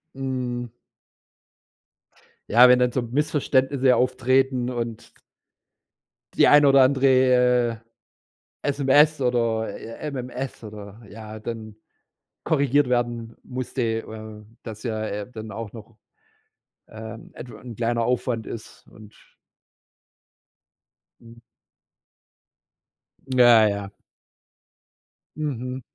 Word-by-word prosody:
Mhm. 125 -3 -4 1.8
Ja, 125 +3 +7
wenn 125 - +7
dann 125 -1 +2
so 130 - -1
Missverständnisse 135 0 +1
auftreten 130 0 +1
und 115 -2 -5 1.2
die - - +4
eine 145 -1 +6
oder 135 -1 +6
andere, 125 -3 +3 0.8
äh, - - -2
SMS 145 +2 +3
oder, 115 -3 0
j 115 - -9 0.2
MMS 125 -1 -6
oder 105 +1 -10
ja, 110 0 -9
dann 110 -1 -7 0.7
korrigiert 140 -2 +2
werden 120 -2 -2
musste, 130 0 -5
äh, 110 -2 -5 0.2
dass 110 -2 -9
ja, 110 -2 -3
äh, 105 +1 -5
dann 110 -2 -8
auch 110 0 -7
noch, 110 0 -13 0.9
ähm, 110 +1 -10
etw 120 0 -10
'n 120 -3 -10
kleiner 115 0 0
Aufwand 125 -2 -1
ist 110 - -10
und 105 -1 -16 2.1
Mhm. 115 0 -16 1.9
Ja, 120 -4 +6
ja. 100 -1 -3 1.5
Mhm. 130 -4 -4
120 Hz, 95 wpm, -23 LUFS, 110-130 Hz, 2.1 s, Ja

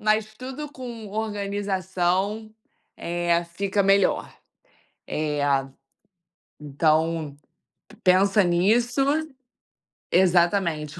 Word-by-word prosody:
Mas 215 0 +1
tudo 265 +5 -7
com 240 -5 -8
organização, 200 0 -2 0.4
eh, 170 0 0
fica 200 0 0
melhor, 195 0 +2 0.7
eh, 150 -1 -2 1.2
então 155 +1 0 0.5
p - - -17
pensa 195 +2 +4
nisso. 225 +9 +2 1.1
Exatamente, 175 -3 +2
195 Hz, 70 wpm, -24 LUFS, 170-215 Hz, 1.2 s, pensa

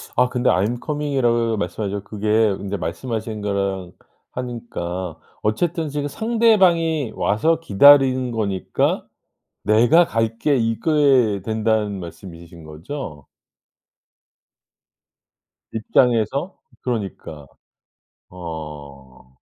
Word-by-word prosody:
아 125 0 +3
근데 125 0 +1
"I'm 110 +6 +1
coming."이라고 125 -7 0
말씀하셨 100 +2 -3
그게 105 +1 -6 0.3
근데 100 +1 -4
말씀하신 110 +5 -4
거랑 100 -3 -2 0.4
하니까 95 -9 -5 0.2
어쨌든 160 +9 -1
지금 145 0 -3
상대방이 185 - +2
와서 160 +11 +1
기다리는 130 -1 +5
거니까 100 -5 -1 0.6
"내가 120 - +5
갈게." 115 +4 0
이게 125 -2 +2
된다는 110 -2 0
말씀이신 85 -1 -11
거죠? 75 - -8 2.4
입장에서 120 - +1 0.3
그러니까. 100 - -5 0.8
어. 75 -7 -10
110 Hz, 225 characters per minute, -21 LUFS, 95-135 Hz, 2.4 s, 기다리는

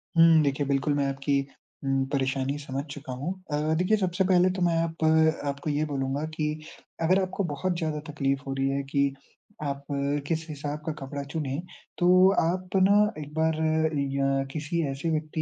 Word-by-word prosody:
हुँ, 165 -1 +7
देखिए 140 0 0
बिल्कुल 140 +1 +1
मैं 140 -1 +1
आपकी 140 +1 0 0.4
उम, 135 -1 +1
परेशानी 135 0 0
समझ 140 -1 -4
चुका 140 -2 -7
हूँ। 145 +9 -3 0.2
अ, 150 +2 +1
देखिए 185 +5 +3
सबसे 185 -1 0
पहले 180 0 +5
तो 185 - -3
मैं 170 -1 +3
आप 165 -1 -4 0.4
आपको 140 +2 -3
ये 150 +1 +1
बोलूँगा 140 0 -2
कि 150 -1 0 0.5
अगर 185 +4 +4
आपको 190 +1 -2
बहुत 175 +5 -1
ज़्यादा 155 -3 -2
तकलीफ़ 135 -2 0
हो 135 - -2
रही 135 0 0
है 140 0 -1
कि 140 -1 +2 0.5
आप 140 -1 -3 0.4
किस 160 0 -1
हिसाब 145 0 -4
का 160 - -1
कपड़ा 140 +1 -5
चुनें, 150 -1 -2 0.4
तो 175 - +2 0.3
आप 180 +3 -1
ना 200 +2 +5 0.2
एक 150 0 -8
बार 160 0 +1 0.6
या 135 0 +1
किसी 155 +3 -2
ऐसे 135 +5 -3
व्यक्ति 155 +1 -2
150 Hz, 175 wpm, -27 LUFS, 140-165 Hz, 0.6 s, हुँ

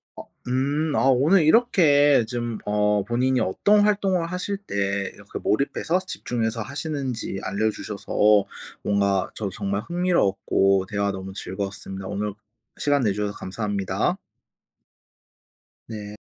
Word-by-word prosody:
어 - - -8 0.2
음 145 +5 0
아 - - +2
오늘 155 +8 +4
이렇게 150 - +5
좀 120 -1 -3
어 105 0 +2
본인이 125 +3 +1
어떤 205 - +3
활동을 195 -4 +2
하실 180 +3 -3
때 100 - -2 0.2
그 - - -4
몰입해서 145 - 0
집중해서 115 -10 -3
하시는지 135 -5 -4
알려 105 +3 0
주셔서 105 0 +1 0.4
뭔가 100 -2 +1
저도 105 -3 -3
정말 100 0 -2
흥미로웠고 100 - +1
대화 100 -1 0
너무 95 0 -7
즐거웠습니다. 95 0 -5
오늘 105 +1 -3 0.5
시간 145 -1 +2
내 105 - +2
주셔서 105 0 -2
감사합니다. 100 -1 -2 1.7
네. 105 -1 -7
110 Hz, 270 characters per minute, -24 LUFS, 100-145 Hz, 1.7 s, 이렇게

